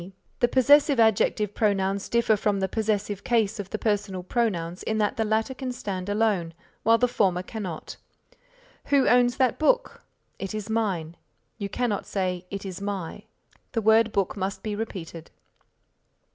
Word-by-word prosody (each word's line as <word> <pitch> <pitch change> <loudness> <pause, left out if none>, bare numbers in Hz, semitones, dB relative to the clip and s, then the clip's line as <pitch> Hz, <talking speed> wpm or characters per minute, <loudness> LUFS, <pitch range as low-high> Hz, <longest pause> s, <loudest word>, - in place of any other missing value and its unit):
B. 185 +3 -11 0.3
(The 240 - +4
possessive 275 +2 +5
adjective 215 -1 +3
pronouns 200 -2 0
differ 235 -2 +3
from 205 -1 0
the 190 - 0
possessive 205 -2 -1
case 225 -5 +1
of 195 -2 -5
the 215 - -3
personal 205 -4 -1
pronouns 180 -6 -1
in 220 - -2
that 210 -1 +1
the 225 - 0
latter 220 +4 0
can 260 -1 -4
stand 200 -6 -5
alone 205 -6 0 0.3
while 230 +2 +5
the 250 - +3
former 185 -6 +1
cannot. 185 -7 -6 0.9
"Who 280 -2 +3
owns 245 0 +4
that 255 -3 +2
book?" - - +1 0.4
"It 195 +2 -4
is 215 0 -5
mine." 185 -8 -1 0.4
You 200 -1 -3
cannot 225 -2 -2
say 185 -2 -2
"it 200 0 -6
is 190 0 -6
my," 200 0 -5 0.5
the 225 - 0
word 220 +1 +5
book 195 -3 0
must 195 0 -4
be 215 -1 -3
repeated.) 170 -7 -6
210 Hz, 160 wpm, -26 LUFS, 190-225 Hz, 0.9 s, possessive